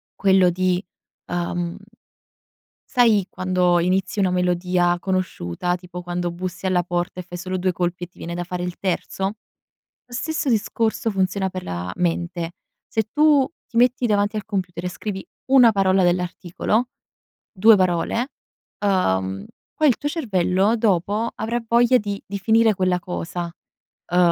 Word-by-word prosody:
quello 190 Hz, -2 st, +4 dB
di, 185 Hz, +1 st, 0 dB, 0.4 s
ehm 175 Hz, 0 st, -2 dB, 1.2 s
sai 220 Hz, -6 st, +5 dB
quando 180 Hz, -1 st, +1 dB
inizi 185 Hz, +3 st, 0 dB
una 190 Hz, -2 st, +3 dB
melodia 180 Hz, 0 st, +1 dB
conosciuta, 180 Hz, -, -2 dB
tipo 180 Hz, 0 st, -9 dB
quando 175 Hz, 0 st, -2 dB
bussi 180 Hz, +2 st, -6 dB
alla 185 Hz, -1 st, +2 dB
porta 175 Hz, +1 st, -3 dB
e -, -, -5 dB
fai 175 Hz, 0 st, -8 dB
solo 185 Hz, +1 st, -3 dB
2 185 Hz, +1 st, +1 dB
colpi 175 Hz, 0 st, -2 dB
e -, -, -9 dB
ti 175 Hz, -, -33 dB
viene 170 Hz, +1 st, -6 dB
da 175 Hz, -, -3 dB
fare 180 Hz, 0 st, -4 dB
il 180 Hz, 0 st, -4 dB
terzo? 190 Hz, 0 st, -2 dB, 0.8 s
Lo 245 Hz, -, -21 dB
stesso 310 Hz, +2 st, -1 dB
discorso 225 Hz, 0 st, 0 dB
funziona 190 Hz, -1 st, 0 dB
per 185 Hz, 0 st, -6 dB
la 90 Hz, 0 st, -4 dB
mente: 170 Hz, -1 st, -1 dB, 0.3 s
se 220 Hz, -, 0 dB
tu 295 Hz, -3 st, +4 dB, 0.2 s
ti 230 Hz, -, -11 dB
metti 250 Hz, +1 st, +3 dB
davanti 205 Hz, -1 st, +1 dB
al 210 Hz, -, -3 dB
computer 180 Hz, -4 st, -4 dB
e -, -, 0 dB
scrivi 190 Hz, +1 st, -5 dB, 0.2 s
una 255 Hz, -4 st, +6 dB
parola 195 Hz, -1 st, +3 dB
dell'articolo, 180 Hz, +6 st, 0 dB, 0.6 s
2 220 Hz, +2 st, +6 dB
parole, 185 Hz, +8 st, 0 dB, 0.5 s
ehm, 95 Hz, -, 0 dB, 0.3 s
poi 310 Hz, -, +3 dB
il 250 Hz, -, +3 dB
tuo 290 Hz, -, -2 dB
cervello 205 Hz, -, +1 dB
dopo 210 Hz, +1 st, +1 dB
avrà 230 Hz, +2 st, -2 dB
voglia 240 Hz, +2 st, +4 dB
di 205 Hz, -2 st, -4 dB
di 200 Hz, +1 st, -4 dB
finire 225 Hz, +1 st, +4 dB
quella 185 Hz, -1 st, +1 dB
cosa, 175 Hz, 0 st, -4 dB, 0.6 s
ehm, 180 Hz, -, +3 dB
185 Hz, 150 wpm, -22 LUFS, 175-215 Hz, 1.2 s, una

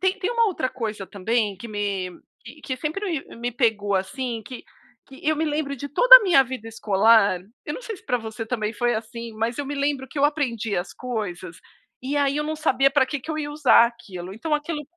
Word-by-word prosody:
tem 380 Hz, +1 st, +1 dB
tem 390 Hz, +2 st, -1 dB
uma 465 Hz, -1 st, +3 dB
outra 355 Hz, -10 st, -1 dB
coisa 215 Hz, -5 st, -5 dB
também 210 Hz, +1 st, -1 dB
que 230 Hz, +5 st, -9 dB
me 200 Hz, -3 st, -2 dB, 0.5 s
que 260 Hz, -, -3 dB
sempre 310 Hz, +10 st, -3 dB, 0.2 s
m -, -, -12 dB
me 240 Hz, +1 st, -3 dB
pegou, 220 Hz, -5 st, +1 dB
assim, 225 Hz, +5 st, -2 dB
que 250 Hz, +4 st, -9 dB, 0.4 s
que 270 Hz, -, -13 dB
eu 310 Hz, -, +2 dB
me 315 Hz, -, 0 dB
lembro 295 Hz, -2 st, -2 dB
de 285 Hz, +2 st, -6 dB
toda -, -, +10 dB
a -, -, +5 dB
minha 340 Hz, -8 st, +6 dB
vida 255 Hz, -3 st, -7 dB
escolar, 220 Hz, -2 st, +3 dB, 0.3 s
eu 295 Hz, -, -4 dB
não -, -, -6 dB
sei 455 Hz, -4 st, -6 dB
se -, -, -20 dB
para 250 Hz, -2 st, 0 dB
você 225 Hz, 0 st, -6 dB
também 220 Hz, -2 st, -2 dB
foi 240 Hz, +2 st, 0 dB
assim, 230 Hz, +1 st, -7 dB
mas 225 Hz, +2 st, -2 dB
eu 285 Hz, -, -3 dB
me 280 Hz, -, -5 dB
lembro 280 Hz, -1 st, -1 dB
que 285 Hz, -, -7 dB
eu 280 Hz, -, +3 dB
aprendia 235 Hz, -, 0 dB
as 175 Hz, -, -9 dB
coisas, 210 Hz, -9 st, -5 dB, 0.4 s
e 275 Hz, +3 st, -2 dB
aí 280 Hz, -1 st, +1 dB
eu 300 Hz, -, 0 dB
não 310 Hz, +1 st, -3 dB
sabia 275 Hz, -3 st, +3 dB
pra 275 Hz, -1 st, +3 dB
que 285 Hz, +1 st, -4 dB
que 315 Hz, -, -7 dB
eu 310 Hz, -, -3 dB
ia 295 Hz, -1 st, -3 dB
usar 290 Hz, -5 st, +5 dB
aquilo, 195 Hz, -6 st, -8 dB
então 300 Hz, +9 st, -5 dB
aquilo 300 Hz, +1 st, -1 dB
250 Hz, 230 wpm, -24 LUFS, 220-295 Hz, 0.5 s, toda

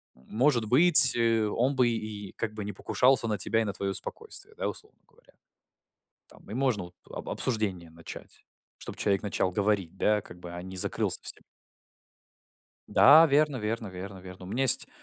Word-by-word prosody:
может 120 Hz, -, -1 dB
быть, 150 Hz, -1 st, +8 dB
э, 115 Hz, -2 st, +1 dB
он 125 Hz, +6 st, -1 dB
бы 125 Hz, -2 st, +2 dB
и 110 Hz, -3 st, -7 dB
как 110 Hz, -1 st, -4 dB
бы 105 Hz, -1 st, -7 dB
не 105 Hz, -, -5 dB
покушался 125 Hz, +4 st, 0 dB
на 105 Hz, -, -2 dB
тебя 115 Hz, -, -1 dB
и -, -, -1 dB
на 100 Hz, -, -4 dB
твоё 100 Hz, -1 st, -4 dB
спокойствие", 440 Hz, -, -9 dB
да, 485 Hz, -, -3 dB
условно 430 Hz, -, -12 dB
говоря. -, -, -28 dB, 0.9 s
Там, -, -, -20 dB
и -, -, -6 dB
можно 130 Hz, -7 st, -1 dB
вот 90 Hz, +1 st, -17 dB, 0.2 s
об -, -, -9 dB
обсуждение 100 Hz, -8 st, -3 dB
начать, 85 Hz, +1 st, -13 dB, 0.3 s
чтобы -, -, -11 dB
человек 100 Hz, 0 st, -1 dB
начал 100 Hz, -2 st, -2 dB
говорить, 100 Hz, -2 st, -2 dB
да, 105 Hz, +1 st, 0 dB
как 90 Hz, -2 st, -15 dB
бы, 90 Hz, -1 st, -10 dB
а 90 Hz, -, -8 dB
не 95 Hz, 0 st, -10 dB
закрылся -, -, 0 dB
совсем. -, -, -4 dB, 1.5 s
Да, 155 Hz, +4 st, +6 dB
верно 150 Hz, -1 st, +1 dB
верно 110 Hz, -1 st, -5 dB
верно 95 Hz, +1 st, -10 dB
верно. 90 Hz, 0 st, -12 dB
У -, -, -11 dB
меня 120 Hz, +7 st, -2 dB
есть 130 Hz, -, +6 dB
110 Hz, 180 wpm, -27 LUFS, 95-130 Hz, 1.5 s, быть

